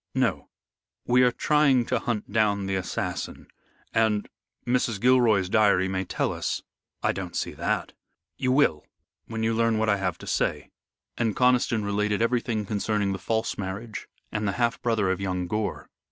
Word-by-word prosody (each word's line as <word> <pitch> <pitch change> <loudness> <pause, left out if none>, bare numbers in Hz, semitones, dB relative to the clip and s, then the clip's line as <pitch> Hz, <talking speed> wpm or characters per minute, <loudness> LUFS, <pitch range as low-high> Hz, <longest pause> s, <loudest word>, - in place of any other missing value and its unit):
"No. - - 0 0.6
We 125 +1 +4
are 125 -1 +5
trying 140 -2 +3
to - - 0
hunt 105 -4 -3
down 105 -2 +2
the 95 - -2
assassin. 95 -1 -3 0.5
And 110 -2 +2 0.4
Mrs. 120 -3 +1
Gilroy's 120 -5 +4
diary 100 -3 +3
may 95 0 -2
tell - - -1
us." - - -3 0.4
"I - - +3
don't - - -6
see - - -1
that." - - -2 0.4
"You 130 - 0
will, 130 - +3 0.4
when 110 -1 -3
you 115 0 +2
learn 115 0 +2
what 110 0 +1
I 100 - +3
have 90 -3 -2
to - - -11
say." - - -1 0.5
And 115 -3 +1
Conniston 125 -4 +3
related 105 0 0
everything 115 -2 0
concerning 105 0 0
the 95 - -5
false 110 +4 -1
marriage 100 +3 -5 0.2
and 105 -1 -1
the 100 - 0
half 120 +1 0
brother 110 -5 +1
of 95 +1 -2
young 90 -2 -1
Gore. 105 +3 -3
110 Hz, 170 wpm, -26 LUFS, 100-120 Hz, 0.6 s, are